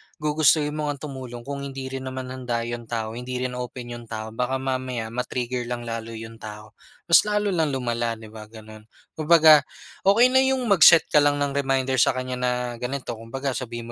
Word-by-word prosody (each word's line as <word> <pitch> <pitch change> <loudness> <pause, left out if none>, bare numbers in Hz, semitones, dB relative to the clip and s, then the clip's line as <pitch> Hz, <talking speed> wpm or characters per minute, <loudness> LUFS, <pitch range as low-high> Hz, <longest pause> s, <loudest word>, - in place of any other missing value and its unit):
gugustuhin 150 0 +2
mo 150 0 -3
ngang 145 -1 -4
tumulong 125 -3 -8
kung 140 +1 -5
hindi 135 -1 -6
rin 130 0 -5
naman 130 -1 -6
handa 120 -3 -3
yung 120 -1 -6
tao, 110 -1 -3
hindi 125 +2 -6
rin 125 0 -2
open 125 -1 -6
yung 120 0 -8
tao 110 -1 -6
baka 125 +3 -2
mamaya 130 -3 -3
ma-trigger 125 0 -3
lang 120 -1 -4
lalo 115 -1 -5
yung 115 0 -9
tao, 105 0 -10 0.3
mas 170 - +7
lalo 210 -1 0
lang 160 -4 +1
lumala, 120 -2 -1
di 110 -1 -13
ba, 110 -1 -10
gano'n. 110 0 -13 0.2
Kumbaga 155 -1 +6 0.5
okey 235 +6 +6
na 260 - +5
yung 265 -1 +2
mag-set 165 -3 +8
ka 150 - +6
lang 145 0 +3
ng 145 -1 -1
reminder 135 -2 0
sa 125 - +4
kanya 130 0 -4
na 125 0 +1 0.3
ganito, 130 +2 -4
kumbaga 125 +5 -4
sabihin 120 -2 -5
130 Hz, 195 wpm, -24 LUFS, 115-140 Hz, 0.5 s, mag-set